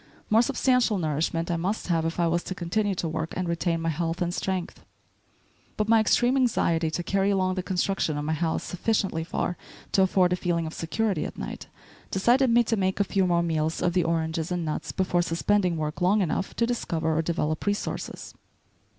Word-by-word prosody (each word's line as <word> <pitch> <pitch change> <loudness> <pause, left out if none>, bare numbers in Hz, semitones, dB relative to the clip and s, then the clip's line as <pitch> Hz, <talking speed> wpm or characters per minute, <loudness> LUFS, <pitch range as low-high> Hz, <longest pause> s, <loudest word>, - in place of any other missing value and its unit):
More 220 +2 +6
substantial 250 -4 +2
nourishment 165 +1 -1
I 170 - 0
must 190 +6 -2
have 165 -2 +1
if 165 +1 -3
I 170 - +3
was 170 +1 +1
to 185 - -4
continue 200 +3 -1
to 175 - -2
work 160 +1 -3
and 185 -1 -1
retain 170 0 0
my 165 - +1
health 165 +2 -2
and 175 -1 -1
strength. 185 -1 -3 0.9
But 215 - 0
my 225 0 +5
extreme 240 +4 +3
anxiety 170 -11 +2
to 175 +2 -3
carry 195 +2 +1
along 185 -2 +1
the 185 - -2
construction 180 -4 -1
of 145 - -3
my 155 - 0
house 160 +1 -1
sufficiently 190 -3 -1
far 175 +1 -2 0.3
to 195 - +3
afford 185 -1 +3
a - - +2
feeling 175 -2 -1
of 160 - -6
security 190 0 -1
at - - -6
night, - - -6 0.4
decided 240 +7 +3
me 235 +1 +5
to 225 - 0
make 190 -1 0
a - - +5
few 195 -1 +1
more 170 -1 +2
meals 160 -1 -1
of 175 - +1
the 180 -1 +2
oranges 160 0 -1
and 175 -2 -1
nuts 155 - -3
before 180 -2 +1
suspending 175 +1 +1
work 155 +2 -3
long 195 +3 +3
enough 185 +3 -2
to 235 - +2
discover 165 -9 -1
or 160 - +2
develop 160 0 -2
resources. 205 0 -3
175 Hz, 200 wpm, -26 LUFS, 165-200 Hz, 0.9 s, More